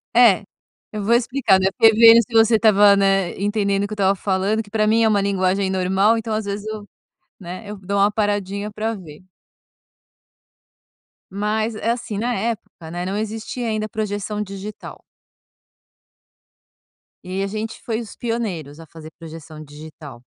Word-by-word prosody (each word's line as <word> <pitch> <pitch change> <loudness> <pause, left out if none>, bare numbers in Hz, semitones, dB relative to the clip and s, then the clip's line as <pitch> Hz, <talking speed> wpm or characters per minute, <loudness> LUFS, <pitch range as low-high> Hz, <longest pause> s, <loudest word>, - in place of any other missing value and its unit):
É, 225 -5 +6 0.5
eu 210 -2 -5
vou 235 +3 +3
explicar, 240 -5 +2
né, 190 - +2
porque 225 0 +5
vendo 230 +1 +8
se 230 +1 -10
você 225 0 +5
estava, 205 -2 +5
né, 195 -2 +1
entendendo 200 -1 0
o - - -4
que 215 - -7
eu - - -5
estava 195 -1 +2
falando, 195 +3 0
que 205 - -14
pra 215 0 +1
mim 225 +2 +3
é - - +4
uma 205 -2 +2
linguagem 190 0 0
normal, 190 +4 +2
então, 220 0 -4
às 215 -1 -3
vezes 205 +1 -5
eu 215 -1 -6 0.5
né, 180 +3 -8
eu 210 - -7
dou 200 +1 -4
uma 200 +1 +4
paradinha 205 -1 -2
pra 220 +2 -3
ver. 165 -5 -12 2.1
Mas 215 +2 -1
é 225 +2 -1
assim, 230 -4 -4
na 240 +3 -1
época, 195 -6 -5
né, 175 +1 -4
não 195 +2 -3
existia 225 +3 -4
ainda 215 -1 -2
projeção 210 -1 -3
digital. 200 +1 -8 2.2
E 185 +2 -3
a 195 - -1
gente 215 +2 -5
foi 230 0 -3
os 220 - -11
pioneiros 180 - -4
a - - -12
fazer 160 +1 -12
projeção 160 -1 -10
digital. 145 -4 -12
205 Hz, 165 wpm, -21 LUFS, 190-220 Hz, 2.2 s, vendo